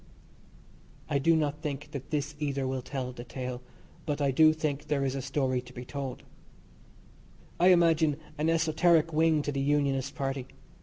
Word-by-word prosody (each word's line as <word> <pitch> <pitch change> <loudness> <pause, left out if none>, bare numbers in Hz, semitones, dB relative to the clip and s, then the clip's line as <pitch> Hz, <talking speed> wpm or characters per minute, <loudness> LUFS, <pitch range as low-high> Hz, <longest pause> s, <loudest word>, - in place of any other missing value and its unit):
I 140 - +2
do 165 +4 +4
not 150 -1 -1
think 150 0 -5
that 140 -4 -7
this 150 -1 -2
either 140 -2 -1
will 130 0 -2
tell 130 -1 -4
the 120 -1 -8
tale, 125 0 -5 0.5
but 145 -1 -1
I 140 -2 +2
do 155 +4 +6
think 150 -2 -3
there 140 -2 0
is 130 - -1
a 135 - -3
story 130 -1 0
to 125 0 -15
be 125 0 -8
told 135 -1 -5 1.4
I 175 - +5
imagine 165 -4 +4 0.2
an 155 +2 +2
esoteric 165 0 +3
wing 160 -1 +3
to 145 - -2
the 140 -1 -2
Unionist 140 -1 0
Party. 135 -3 -3
145 Hz, 170 wpm, -29 LUFS, 135-155 Hz, 1.4 s, do